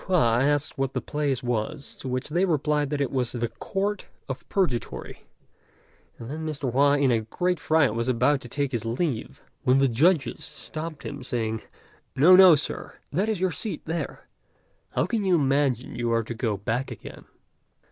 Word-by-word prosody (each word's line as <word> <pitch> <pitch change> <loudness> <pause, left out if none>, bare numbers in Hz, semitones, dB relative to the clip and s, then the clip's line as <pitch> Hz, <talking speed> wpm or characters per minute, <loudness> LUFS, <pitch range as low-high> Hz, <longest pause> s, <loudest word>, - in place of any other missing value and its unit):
Hua 120 -11 +3
asked 145 0 0
what 135 0 0
the - - 0
place 145 -4 -2
was; 120 +4 -2
to - - -7
which 130 +2 -2
they 175 +5 +1
replied 150 -4 +1
that 145 -1 -1
it 140 - 0
was 125 -3 -1
the 120 -1 -1
Court 195 - -3 0.2
of 130 -1 -7
Purgatory, 160 -12 -2 0.9
and 115 - -8
then 155 +5 -5
Mr. 145 -5 -3
Hua 140 +3 +4
in 140 -3 +3
a 115 -2 +2
great 180 +10 -1
fright 155 -5 +3
was 115 +1 -1
about 130 +3 +2
to 120 - -9
take 140 +1 -1
his 120 -4 -2
leave, 120 +2 -3 0.2
when 130 +1 +3
the 135 0 +4
judges 150 +6 +2
stopped 155 +2 -5
him, 140 -2 -6
saying, 110 -3 -2 0.5
"No, 160 +7 +7
no, 185 -3 +9
Sir! 150 - -3 0.2
that 195 +8 0
is 215 -4 -1
your 185 0 +1
seat 215 +4 -4
there; 165 +1 -4 0.6
how - - 0
can 225 -3 -1
you 185 -2 +3
imagine 135 -4 +1
you 120 -1 -1
are 115 0 +2
to 115 - -5
go 110 -3 -1
back 115 +6 -2
again?" - - -10
140 Hz, 185 wpm, -26 LUFS, 120-160 Hz, 0.9 s, no